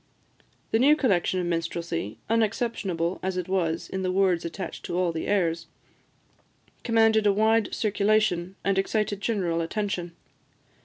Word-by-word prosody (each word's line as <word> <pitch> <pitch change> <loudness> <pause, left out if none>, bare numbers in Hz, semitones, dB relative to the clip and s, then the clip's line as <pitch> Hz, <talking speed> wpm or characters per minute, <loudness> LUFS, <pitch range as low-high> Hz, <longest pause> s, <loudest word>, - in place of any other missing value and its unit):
The 225 - +3
new 285 +5 +6
collection 190 - +1
of 180 - -1
minstrelsy, 170 0 -3
unexceptionable 210 -6 -1
as 190 0 -2
it 180 - -3
was 170 -3 -1
in 190 - -4
the 185 -1 0
words 185 -2 +2
attached 180 +3 -6
to 175 - -3
all 180 -2 +1
the 160 -1 -4
airs, 165 -5 0 1.2
commanded 225 -2 +3
a - - +6
wide 220 +1 +2
circulation, 200 -4 +1
and 195 0 +2
excited 205 0 -1
general 180 -7 0
attention. 175 -1 -3
190 Hz, 140 wpm, -26 LUFS, 170-215 Hz, 1.2 s, new